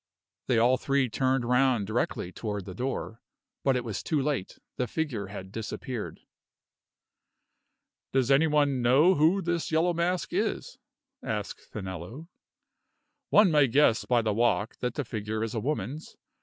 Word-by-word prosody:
They 125 Hz, -, +2 dB
all 120 Hz, +3 st, +4 dB
three 140 Hz, -2 st, +1 dB
turned 130 Hz, +2 st, 0 dB
round 125 Hz, -3 st, +2 dB
directly 110 Hz, -4 st, -2 dB
toward 105 Hz, -2 st, -5 dB
the 95 Hz, -, -7 dB
door. 120 Hz, 0 st, -4 dB, 0.4 s
But 135 Hz, -1 st, +3 dB
it 125 Hz, -, -1 dB
was 110 Hz, -4 st, -4 dB
too 155 Hz, -, 0 dB
late 135 Hz, -8 st, -2 dB, 0.2 s
the 125 Hz, -, -1 dB
figure 120 Hz, -8 st, -3 dB
had 95 Hz, -1 st, -8 dB
disappeared. 115 Hz, +2 st, -5 dB, 1.9 s
"Does 130 Hz, 0 st, +2 dB
any 145 Hz, +4 st, +5 dB
one 145 Hz, -4 st, +2 dB
know 135 Hz, +10 st, +5 dB
who 175 Hz, +4 st, +3 dB
this 170 Hz, -1 st, -2 dB
Yellow 165 Hz, +3 st, +2 dB
Mask 170 Hz, +2 st, -1 dB
is?" -, -, -2 dB, 0.4 s
asked -, -, -5 dB
Finello. 95 Hz, -, -7 dB, 1.0 s
"One 210 Hz, -4 st, +6 dB
may 150 Hz, -3 st, +5 dB
guess 125 Hz, -2 st, +3 dB
by 120 Hz, -2 st, +2 dB
the 110 Hz, -1 st, 0 dB
walk 115 Hz, -1 st, +1 dB
that 125 Hz, -1 st, -3 dB
the 145 Hz, -, -2 dB
figure 110 Hz, 0 st, -3 dB
is 115 Hz, -, -3 dB
a 115 Hz, -, -1 dB
woman's. 140 Hz, -, -4 dB
125 Hz, 150 wpm, -28 LUFS, 110-150 Hz, 1.9 s, One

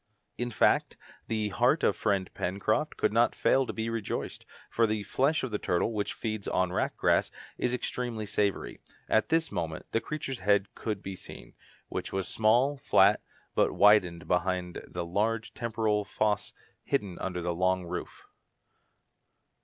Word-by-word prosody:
In 120 Hz, 0 st, -2 dB
fact, 115 Hz, -, +2 dB, 0.3 s
the 110 Hz, -2 st, -1 dB
heart 90 Hz, -, +2 dB
of -, -, +3 dB
friend 95 Hz, -2 st, 0 dB
Pencroft 110 Hz, +11 st, -1 dB
could -, -, +1 dB
not 115 Hz, +1 st, +3 dB
fail 135 Hz, -1 st, +3 dB
to -, -, -2 dB
be 110 Hz, 0 st, -3 dB
rejoiced, 115 Hz, -3 st, -4 dB, 0.2 s
for 115 Hz, -1 st, +2 dB
the 105 Hz, -1 st, -1 dB
flesh 135 Hz, +9 st, +1 dB
of 130 Hz, -, -3 dB
the 105 Hz, -, -1 dB
turtle, 90 Hz, +6 st, 0 dB
which 105 Hz, -1 st, -2 dB
feeds 110 Hz, -3 st, -4 dB
on 90 Hz, -1 st, +1 dB
wrack -, -, -1 dB
grass, -, -, +3 dB, 0.3 s
is 125 Hz, -, +1 dB
extremely 120 Hz, -3 st, -3 dB
savoury. 100 Hz, -1 st, -1 dB, 0.3 s
At 110 Hz, -, +2 dB
this 165 Hz, 0 st, +1 dB
moment 80 Hz, -2 st, -3 dB
the 115 Hz, -, +1 dB
creature's 140 Hz, -4 st, -4 dB
head 100 Hz, +1 st, +2 dB
could 105 Hz, -3 st, -4 dB
be 95 Hz, 0 st, -5 dB
seen, -, -, -11 dB, 0.3 s
which -, -, -4 dB
was 95 Hz, -1 st, -2 dB
small, 120 Hz, +6 st, +3 dB
flat, 100 Hz, -5 st, +4 dB, 0.3 s
but -, -, +2 dB
widened 90 Hz, -6 st, +4 dB
behind 90 Hz, 0 st, 0 dB
by -, -, -6 dB
the 90 Hz, -1 st, -4 dB
large 110 Hz, +5 st, -1 dB
temporal 110 Hz, -3 st, 0 dB
fossæ 105 Hz, 0 st, -1 dB, 0.3 s
hidden 100 Hz, -10 st, -1 dB
under 90 Hz, -2 st, -3 dB
the 85 Hz, 0 st, 0 dB
long 95 Hz, +1 st, +1 dB
roof. 85 Hz, -, -6 dB
105 Hz, 160 wpm, -29 LUFS, 95-115 Hz, 0.3 s, flat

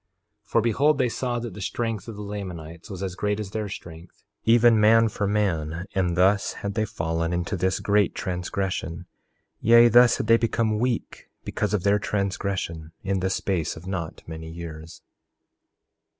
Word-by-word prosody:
4:26 -, -, -32 dB
For 115 Hz, -, +4 dB
behold, 140 Hz, +6 st, +2 dB
they 130 Hz, -3 st, +2 dB
saw 120 Hz, +1 st, -2 dB
that 120 Hz, -3 st, -5 dB
the 105 Hz, -, -8 dB
strength 115 Hz, +1 st, -3 dB
of 115 Hz, -, -7 dB
the 105 Hz, -, -7 dB
Lamanites 90 Hz, -4 st, -7 dB
was 95 Hz, -2 st, -6 dB
as 95 Hz, -2 st, -3 dB
great 105 Hz, +2 st, -1 dB
as 100 Hz, -3 st, -5 dB
their 105 Hz, -1 st, -3 dB
strength, 85 Hz, -1 st, -10 dB, 0.2 s
even 115 Hz, 0 st, +5 dB
man 115 Hz, +1 st, +5 dB
for 100 Hz, -1 st, -2 dB
man. 85 Hz, -5 st, -1 dB
And 90 Hz, -3 st, 0 dB
thus 95 Hz, +3 st, +3 dB
had 100 Hz, 0 st, -5 dB
they 110 Hz, +1 st, 0 dB
fallen 85 Hz, -5 st, -2 dB
into 85 Hz, +3 st, -1 dB
this 95 Hz, +1 st, 0 dB
great 100 Hz, -2 st, +2 dB
transgression; 90 Hz, -1 st, -3 dB, 0.5 s
yea, 115 Hz, +1 st, +7 dB
thus 120 Hz, +1 st, +6 dB
had -, -, -2 dB
they 115 Hz, +1 st, +6 dB
become 115 Hz, -2 st, 0 dB
weak, 120 Hz, -1 st, -2 dB
because -, -, -1 dB
of 95 Hz, -, -2 dB
their 100 Hz, +1 st, +3 dB
transgression, 95 Hz, -6 st, -3 dB
in 95 Hz, 0 st, 0 dB
the 95 Hz, +1 st, 0 dB
space 95 Hz, -4 st, -1 dB
of 80 Hz, -, -11 dB
not 90 Hz, -4 st, -5 dB
many 80 Hz, 0 st, -7 dB
years. 80 Hz, -1 st, -9 dB
100 Hz, 175 wpm, -25 LUFS, 85-110 Hz, 0.5 s, yea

